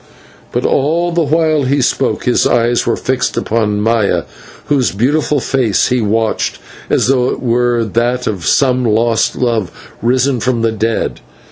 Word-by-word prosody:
But -, -, -2 dB
all 165 Hz, +5 st, +1 dB
the 170 Hz, 0 st, +1 dB
while 155 Hz, 0 st, +1 dB
he 140 Hz, +2 st, +1 dB
spoke 130 Hz, -, 0 dB
his -, -, +2 dB
eyes 120 Hz, 0 st, +1 dB
were 115 Hz, -, +2 dB
fixed 130 Hz, 0 st, -2 dB
upon 105 Hz, -2 st, 0 dB
Maya, 110 Hz, -2 st, +1 dB, 0.4 s
whose 140 Hz, -4 st, +1 dB
beautiful 145 Hz, +7 st, 0 dB
face 125 Hz, -6 st, +1 dB
he 125 Hz, -1 st, +1 dB
watched 110 Hz, +1 st, -1 dB, 0.3 s
as -, -, +2 dB
though 125 Hz, -1 st, +2 dB
it -, -, -3 dB
were 120 Hz, -1 st, +1 dB
that 120 Hz, +4 st, -1 dB
of 95 Hz, -6 st, -3 dB
some 130 Hz, -2 st, +2 dB
lost 115 Hz, 0 st, +1 dB
love 115 Hz, -7 st, -1 dB, 0.3 s
risen 125 Hz, +2 st, +1 dB
from 120 Hz, 0 st, -1 dB
the 115 Hz, -, +2 dB
dead. 110 Hz, +1 st, -2 dB
120 Hz, 155 wpm, -14 LUFS, 115-135 Hz, 0.4 s, his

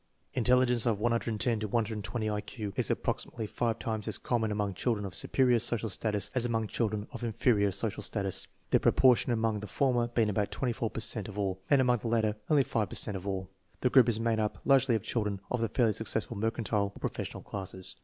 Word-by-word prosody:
Intelligence 125 Hz, -1 st, +3 dB
of 110 Hz, -4 st, +1 dB
110 115 Hz, 0 st, 0 dB
to 110 Hz, -, -2 dB
120 110 Hz, 0 st, -2 dB
I 105 Hz, -1 st, -1 dB
Q 105 Hz, -1 st, -6 dB
is -, -, 0 dB
approximately 115 Hz, -2 st, -2 dB
five 115 Hz, +1 st, -1 dB
times 110 Hz, -2 st, -3 dB
as -, -, 0 dB
common 115 Hz, -3 st, -1 dB
among 105 Hz, -1 st, -1 dB
children 105 Hz, +1 st, -1 dB
of 95 Hz, -, -6 dB
superior 125 Hz, +5 st, +2 dB
social 115 Hz, 0 st, -1 dB
status 105 Hz, 0 st, 0 dB
as 125 Hz, -, +1 dB
among 115 Hz, -2 st, 0 dB
children 105 Hz, -1 st, -1 dB
of -, -, -7 dB
inferior 110 Hz, -3 st, +2 dB
social 100 Hz, +2 st, -2 dB
status; 100 Hz, -2 st, -2 dB, 0.2 s
the -, -, +5 dB
proportion 125 Hz, -1 st, +4 dB
among 110 Hz, -2 st, +1 dB
the 105 Hz, -, -7 dB
former 120 Hz, +1 st, +1 dB
being 115 Hz, -3 st, +1 dB
about 100 Hz, 0 st, 0 dB
24 120 Hz, -3 st, -2 dB
per -, -, -5 dB
cent 110 Hz, -3 st, -1 dB
of 105 Hz, -1 st, -9 dB
all, 95 Hz, -2 st, -1 dB
and 140 Hz, -2 st, +5 dB
among 125 Hz, -2 st, +3 dB
the 115 Hz, -, -4 dB
latter 110 Hz, -2 st, +1 dB
only 150 Hz, -3 st, +5 dB
5 110 Hz, -4 st, -1 dB
per -, -, -6 dB
cent 105 Hz, -, 0 dB
of 95 Hz, +1 st, -6 dB
all. 95 Hz, -1 st, -2 dB, 0.3 s
The 125 Hz, -, +2 dB
group 125 Hz, -3 st, +6 dB
is 110 Hz, -2 st, 0 dB
made 115 Hz, -1 st, +1 dB
up 105 Hz, -1 st, -1 dB
largely 135 Hz, -3 st, +4 dB
of 110 Hz, -, -2 dB
children 105 Hz, -4 st, -1 dB
of 125 Hz, -, 0 dB
the 115 Hz, -, 0 dB
fairly 115 Hz, -1 st, +2 dB
successful 110 Hz, +1 st, -2 dB
mercantile 105 Hz, -2 st, -1 dB
or -, -, -11 dB
professional -, -, -4 dB
classes. 95 Hz, -2 st, -4 dB
110 Hz, 215 wpm, -30 LUFS, 105-120 Hz, 0.3 s, group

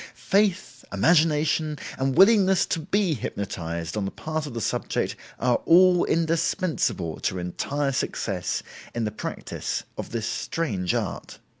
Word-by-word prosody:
Faith, 195 Hz, -2 st, 0 dB
imagination, 155 Hz, -2 st, +2 dB, 0.2 s
and 135 Hz, 0 st, 0 dB
willingness 195 Hz, -2 st, +6 dB
to 165 Hz, -, -1 dB
be 190 Hz, +2 st, +1 dB
hypnotized 85 Hz, -, -4 dB
on 105 Hz, -, -1 dB
the 95 Hz, -, -1 dB
part 155 Hz, +4 st, -4 dB
of 125 Hz, -, -8 dB
the -, -, -2 dB
subject 110 Hz, -, -1 dB, 0.2 s
are 125 Hz, 0 st, +2 dB
all 180 Hz, +1 st, +6 dB
indispensable 165 Hz, -, 0 dB
to 95 Hz, -, -1 dB
entire 135 Hz, +11 st, -2 dB
success 90 Hz, -9 st, -2 dB, 0.3 s
in 120 Hz, -, -1 dB
the 105 Hz, -, -1 dB
practice 105 Hz, -, -4 dB, 0.2 s
of -, -, -4 dB
this 115 Hz, -2 st, -3 dB
strange 105 Hz, -, -2 dB
art. -, -, -4 dB
150 Hz, 135 wpm, -25 LUFS, 105-170 Hz, 0.3 s, willingness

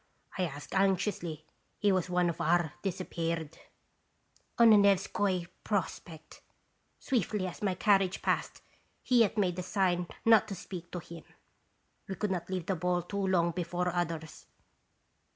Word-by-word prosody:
I 185 Hz, -, 0 dB
asked 145 Hz, -3 st, -8 dB
anxiously; 190 Hz, -5 st, 0 dB, 0.3 s
he 205 Hz, -1 st, +2 dB
was 185 Hz, -1 st, 0 dB
one 180 Hz, 0 st, +2 dB
of 170 Hz, -, -3 dB
our 170 Hz, -3 st, +2 dB
'disappeared.' 165 Hz, -4 st, -3 dB, 1.0 s
"'On 235 Hz, -1 st, +7 dB
the -, -, +9 dB
Nevskoi 195 Hz, -2 st, +2 dB, 0.2 s
Prospect. 165 Hz, -5 st, -4 dB, 0.6 s
Swiftly 215 Hz, -, -1 dB
as 180 Hz, -, -7 dB
my 195 Hz, -3 st, 0 dB
carriage 195 Hz, -1 st, +2 dB
passed, -, -, -1 dB, 0.4 s
he 250 Hz, -1 st, +3 dB
yet 225 Hz, -1 st, +3 dB
made 185 Hz, -4 st, +1 dB
the -, -, -2 dB
sign 180 Hz, -2 st, 0 dB, 0.2 s
not 225 Hz, -2 st, +6 dB
to 200 Hz, -, -5 dB
speak 175 Hz, -1 st, -8 dB
to -, -, -3 dB
him.* 170 Hz, -1 st, -9 dB, 0.8 s
"We 190 Hz, -, -4 dB
could 210 Hz, 0 st, -2 dB
not 175 Hz, -2 st, -3 dB
leave 185 Hz, -3 st, -3 dB
the 190 Hz, -, 0 dB
ball 180 Hz, +1 st, 0 dB
too 195 Hz, +2 st, -2 dB
long 170 Hz, -2 st, +2 dB
be 180 Hz, -, -3 dB
fore 175 Hz, +1 st, -1 dB
others." 165 Hz, -3 st, -4 dB
180 Hz, 150 wpm, -31 LUFS, 170-195 Hz, 1.0 s, the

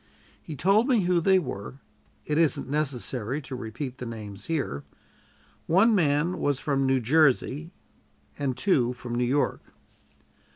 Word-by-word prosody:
He 155 Hz, -, -8 dB
told 200 Hz, -, +3 dB
me 245 Hz, -6 st, +3 dB
who 175 Hz, -1 st, +2 dB
they 190 Hz, +3 st, +4 dB
were; 130 Hz, -, -4 dB, 0.5 s
it 150 Hz, +1 st, 0 dB
isn't 165 Hz, -3 st, +1 dB
necessary 135 Hz, -3 st, -2 dB
to 130 Hz, -, -6 dB
repeat 125 Hz, +3 st, -6 dB
the 125 Hz, -, -5 dB
names 105 Hz, -3 st, -7 dB
here. 140 Hz, -, -2 dB, 0.8 s
One 195 Hz, +8 st, +5 dB
man 165 Hz, -1 st, +1 dB
was 145 Hz, -2 st, 0 dB
from 135 Hz, -2 st, 0 dB
New 130 Hz, 0 st, +3 dB
Jersey 150 Hz, +3 st, +2 dB, 0.7 s
and 135 Hz, -3 st, -1 dB
two 130 Hz, -5 st, +2 dB
from 120 Hz, -1 st, -7 dB
New 120 Hz, +1 st, 0 dB
York. 140 Hz, +4 st, 0 dB
140 Hz, 140 wpm, -26 LUFS, 125-165 Hz, 0.8 s, One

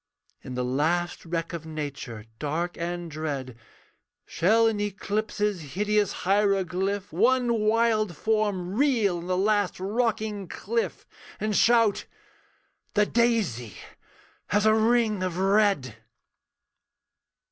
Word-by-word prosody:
In 130 Hz, -, -7 dB
the 125 Hz, 0 st, -1 dB
last 165 Hz, +7 st, -1 dB
wreck 165 Hz, 0 st, -3 dB
of 170 Hz, -2 st, -5 dB
Nature, 145 Hz, -8 st, -6 dB
dark 165 Hz, +4 st, -2 dB
and 175 Hz, 0 st, -4 dB
dread, 140 Hz, -5 st, -4 dB, 0.7 s
Shall 220 Hz, +7 st, +3 dB
in 225 Hz, -2 st, +1 dB
eclipse's 205 Hz, -, -2 dB
hideous 210 Hz, 0 st, +1 dB
hieroglyph, 195 Hz, -1 st, +1 dB
One 235 Hz, +4 st, +2 dB
wild 215 Hz, -4 st, +2 dB
form 205 Hz, -4 st, 0 dB
reel 225 Hz, -8 st, +2 dB
on 170 Hz, -, -8 dB
the 185 Hz, 0 st, 0 dB
last 205 Hz, -1 st, +1 dB
rocking 215 Hz, -1 st, -1 dB
cliff, 230 Hz, +7 st, -3 dB, 0.3 s
And 215 Hz, -1 st, -1 dB
shout, 230 Hz, -2 st, +3 dB, 0.9 s
'The 210 Hz, 0 st, +4 dB
daisy 205 Hz, -, 0 dB, 0.7 s
has 205 Hz, +1 st, +1 dB
a 215 Hz, -, +6 dB
ring 220 Hz, -2 st, +2 dB
of 185 Hz, -2 st, -2 dB
red.' 195 Hz, -, +2 dB
200 Hz, 110 wpm, -26 LUFS, 170-215 Hz, 0.9 s, a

